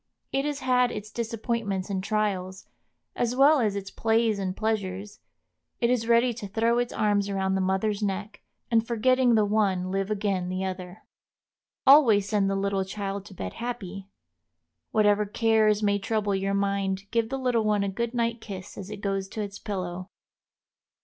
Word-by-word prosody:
It 275 +1 0
has 295 -1 -3
had 250 -1 +3
its 210 0 -6
disappointments 225 -4 -2
and 190 -1 -2
trials, 195 -3 -2 0.5
as 240 0 0
well 285 +3 +6
as 210 -4 +1
its 195 -1 -5
plays 225 -1 +1
and 190 -1 -3
pleasures; 205 -2 -2 0.6
it 235 0 +2
is 230 -2 0
ready 235 +1 +4
to 215 -3 -7
throw 230 +4 +1
its 245 0 -1
arms 205 -1 +1
around 190 -1 0
the 190 - +1
mother's 190 +3 0
neck, 205 +1 -3 0.3
and 225 -1 +3
forgetting 245 +1 +3
the 215 -1 +4
one 195 -3 +1
live 195 +1 -1
again 195 -4 -1
the 185 +1 -2
other. 185 +1 -6 0.8
Always 245 -8 +6
send 205 -2 +1
the 195 - 0
little 195 0 0
child 195 0 -5
to 195 - -12
bed 95 - -5
happy. 200 -5 -6 0.8
Whatever 210 -1 +3
cares 220 -1 +2
may 205 0 +2
trouble 205 0 -1
your 195 +1 0
mind 195 -1 0
give 230 -1 +1
the 270 - -2
little 250 -4 +1
one 210 -1 +2
a - - -1
good 235 +5 -3
night 235 -1 0
kiss 190 -3 -8
as 195 0 -7
it 210 -1 -7
goes 195 -1 -1
to 215 - -5
its 200 -1 -7
pillow. 185 -2 -5
205 Hz, 175 wpm, -26 LUFS, 195-230 Hz, 0.8 s, well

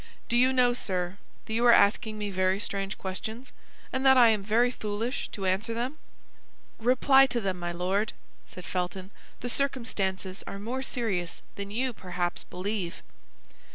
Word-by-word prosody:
"Do 235 - +1
you 255 +2 +5
know, 250 -2 +4
sir, 185 -4 -3 0.3
that 220 - -5
you 230 +2 +1
are 240 - +9
asking 215 +1 +4
me 205 -1 -3
very 185 +1 +1
strange 195 -1 -3
questions, 220 +7 -6 0.4
and 260 - 0
that 265 -1 +7
I 240 -2 +8
am 215 -2 +2
very 230 +5 +3
foolish 220 +3 -3
to 195 - -5
answer 195 +5 0
them?" 255 +6 -3 0.8
"Reply 265 +3 +5
to 245 - -1
them, 190 -4 -2
my 175 0 -3
Lord," 190 +5 0 0.3
said 180 -3 -11
Felton; 185 +1 -3 0.3
"the 245 - -3
circumstances 205 -8 -2
are - - -5
more 235 +6 -3
serious 215 -10 -2
than 200 0 -5
you 250 +4 -1
perhaps 180 -3 -3
believe." 185 -1 -4
210 Hz, 160 wpm, -28 LUFS, 190-245 Hz, 0.8 s, are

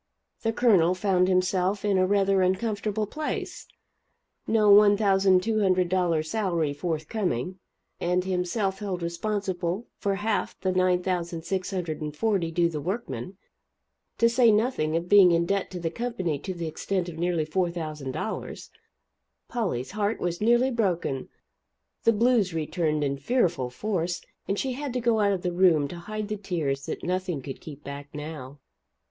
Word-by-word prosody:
The 225 - +1
Colonel 195 -7 +4
found 185 -1 +2
himself 185 +2 +1
in 200 -2 +2
a 185 - +3
rather 195 -1 +3
uncomfortable 210 +2 0
place 305 +9 -5 0.8
no 215 -2 +4
$1,200 190 -4 +3
salary 170 -5 0
forthcoming; 175 - -2 0.4
and 180 +1 +1
himself 190 +2 -1
held 190 -4 -3
responsible 185 +2 -2
for 200 -1 0
half 210 +1 -1
of - - -46
the 185 - +2
$9,640 180 0 -1
due 170 +1 +2
the 155 -3 -4
workmen, 180 - -4 0.8
to 230 - +5
say 235 -1 +5
nothing 210 -8 +1
of 170 +1 -4
being 195 -2 +7
in 170 0 +2
debt 195 +2 -1
to 180 - -6
the 165 -1 -2
company 190 - -2
to 190 +5 -5
the 170 -1 -4
extent 180 +3 -2
of 165 -2 -7
nearly 170 -2 0
$4,000. 160 0 -3 0.8
Polly's 185 - -2
heart 210 +1 -1
was 175 +1 -2
nearly 240 +4 +4
broken; 175 - -1 0.8
the 230 - +7
"blues" 225 -5 +2
returned 155 -1 0
in 140 -1 -1
fearful 170 - 0
force, 175 +3 -2 0.3
and 200 - -1
she 265 - -1
had 275 0 -4
to 250 - 0
go 235 -2 +2
out 205 -1 +3
of 190 -2 -2
the 180 -1 -1
room 175 -5 +4
to 175 - -7
hide 215 +4 -5
the 215 0 -3
tears 160 -9 -2
that - - -5
nothing 180 -3 -1
could 135 - -7
keep 150 -2 -10
back 140 0 -7
now. 150 -2 -7
185 Hz, 145 wpm, -26 LUFS, 165-205 Hz, 0.8 s, being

